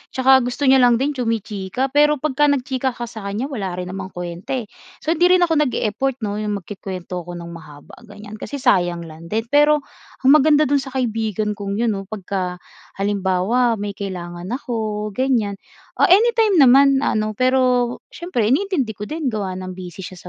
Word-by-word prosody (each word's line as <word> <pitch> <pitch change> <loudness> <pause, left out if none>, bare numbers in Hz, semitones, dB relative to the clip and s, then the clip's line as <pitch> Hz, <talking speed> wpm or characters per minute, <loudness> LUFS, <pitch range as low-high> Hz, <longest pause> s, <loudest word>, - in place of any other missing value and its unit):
tsaka 265 0 +6
gusto 245 +3 -3
niya 265 -1 +6
lang 245 -1 +5
din 270 +5 0
chumi-chika 225 -1 -2
pero 295 +1 +4
pagka 295 0 +1
nagchika 265 -2 -1
ka 240 - -6
sa 220 -3 -8
kanya 225 +8 -3
wala 195 -8 -4
rin 180 0 -5
namang 190 0 -5
kwenta, 175 +7 -5
eh. 250 - -2 0.4
So, 315 - 0
hindi 345 +2 +4
rin 360 - +3
ako 330 -2 +2
nag-e-effort 250 +3 -1
'no 205 -1 -2
yung 210 -1 -2
magkukuwento 185 -2 -6
ako 175 - -6
ng 170 0 -8
mahaba 150 -4 -12
ganiyan 210 +1 -11
kasi 285 - -6
sayang 175 -7 +2
lang 160 +1 -11
din, 225 +1 0
pero 295 0 +4 0.4
ang 260 - +5
maganda 305 0 +5
dun 285 0 +2
sa 265 - -9
kaibigan 220 -4 -1
kong 200 -1 -4
yun 235 -1 +2
'no 195 - -5
pagka 190 -3 -4 0.4
halimbawa 205 +4 +1
may 205 0 -3
kailangan 175 -3 -6
ako 220 -5 -3
ganiyan, 225 -5 0 0.4
ah, - - +5
anytime 440 +1 +4
naman 275 +1 +6
ano 215 -3 0
pero 255 0 +2
siyempre 325 -11 -2
iniintindi 285 - +1
ko 205 - -7
din 310 -2 -3
gawa 205 -4 -3
ng 185 0 -7
busy 180 -1 -9
siya 185 - -9
225 Hz, 180 wpm, -20 LUFS, 195-270 Hz, 0.4 s, tsaka